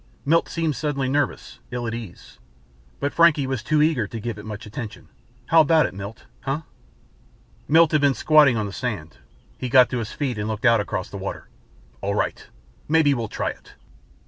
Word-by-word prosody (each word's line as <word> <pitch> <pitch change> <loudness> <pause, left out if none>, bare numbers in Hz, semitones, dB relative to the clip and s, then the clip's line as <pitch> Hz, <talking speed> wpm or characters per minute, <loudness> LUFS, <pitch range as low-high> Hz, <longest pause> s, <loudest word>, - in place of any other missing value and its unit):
Milt 165 +4 +3
seemed 165 -3 -1
suddenly 145 -3 -1
nervous, 145 +2 -2
ill 125 -1 -4
at 115 - -3
ease. 115 -6 -9 0.6
But 140 - -2
Frankie 165 -4 +4
was 130 -3 -2
too 150 +6 +2
eager 145 -9 +1
to 115 - -6
give 110 -1 -5
it 105 - -10
much 110 +2 -7
attention. 110 +1 -8 0.4
"How 165 +4 +6
about 155 +1 +4
it, - - -4
Milt 100 +3 -8
huh?" 140 +3 -3 1.1
Milt 160 +1 +5
had 155 -2 +3
been 140 -2 +3
squatting 150 -6 +5
on 105 - -1
the 100 - -6
sand. 100 -12 -5 0.4
He 125 - -3
got 125 0 +6
to 125 - -1
his 110 -2 -5
feet 125 -6 -3
and 105 - -2
looked 110 +2 -3
out 115 -2 +5
across 100 -1 -3
the 100 - -6
water. 95 - -6 0.5
"All - - -1
right. - - -2 0.4
Maybe 155 -2 +4
we'll 115 -4 -2
try - - -2
it." - - -16
130 Hz, 195 wpm, -23 LUFS, 110-150 Hz, 1.1 s, How